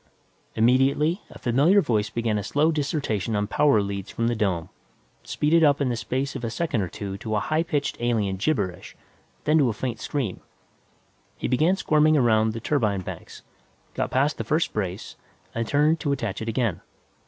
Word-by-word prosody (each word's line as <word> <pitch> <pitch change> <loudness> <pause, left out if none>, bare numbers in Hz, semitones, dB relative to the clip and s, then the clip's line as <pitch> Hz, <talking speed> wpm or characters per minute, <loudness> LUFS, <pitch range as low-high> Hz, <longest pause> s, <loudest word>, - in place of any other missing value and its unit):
Immediately, 135 - +3
a - - -12
familiar 145 - +3
voice 110 - 0
began 115 -2 -1
a - - -4
slow 150 +9 +2
dissertation 140 - -1
on 105 0 0
power 110 -1 +3
leads 100 0 -5
from 115 - -2
the 120 - 0
dome, 95 -7 -1 0.5
speeded 160 +2 +2
up 145 -2 +4
in 140 -3 +1
the 120 - 0
space 130 +4 -3
of - - -5
a 115 - -1
second 130 -3 -1
or 95 - -2
two 100 +2 -6
to 110 -1 -3
a - - +2
high 155 +9 0
pitched 155 -4 -2
alien 110 -5 0
gibberish, 100 - -2 0.5
then 155 +1 +3
to 135 -4 +3
a - - -1
faint 115 0 -4
scream. 130 -10 -3 1.0
He - - -3
began 155 +9 +3
squirming 155 -4 +3
around 110 -4 +3
the 115 - -5
turbine 110 -7 0
tanks, - - -9 0.5
got - - -2
past 140 +4 +1
the - - -1
first 155 +2 0
brace, 95 -1 -4 0.4
and 115 -1 -2
turned 150 +3 +2
to 145 - -1
attach 115 -8 -3
it 110 - -3
again. 110 -6 -1
120 Hz, 185 wpm, -25 LUFS, 105-150 Hz, 1.0 s, up